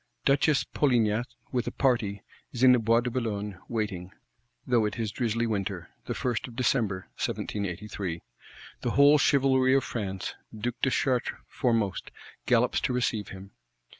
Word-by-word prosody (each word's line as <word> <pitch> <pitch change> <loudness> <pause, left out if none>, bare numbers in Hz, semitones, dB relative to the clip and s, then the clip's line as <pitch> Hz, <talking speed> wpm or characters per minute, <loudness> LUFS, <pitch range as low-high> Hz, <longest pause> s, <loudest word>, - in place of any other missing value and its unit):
Duchess 140 +1 +3
Polignac, 120 -4 +1 0.2
with 125 -2 -1
a - - -1
party, 115 -7 0 0.3
is 125 0 -3
in 130 - +9
the 125 - +5
Bois 115 +1 +3
de 125 0 -3
Boulogne, 105 -6 -3
waiting; 105 -6 -3 0.6
though 120 -3 +3
it 105 - -3
is 110 -3 -2
drizzly 115 0 -1
winter; 100 -5 -3
the - - -3
1st 120 -2 -2
of 120 - -12
December 115 -6 +1 0.2
1783. 95 -3 -3 0.6
The - - -1
whole 145 +1 +7
chivalry 130 -2 +4
of 135 - +3
France, 95 -5 -4 0.2
Duke 120 +2 -4
de 135 - +3
Chartres 130 -2 0
foremost, 115 -6 0 0.4
gallops - - +3
to - - 0
receive 115 -4 0
him. 95 +1 -10
115 Hz, 150 wpm, -28 LUFS, 100-125 Hz, 0.6 s, in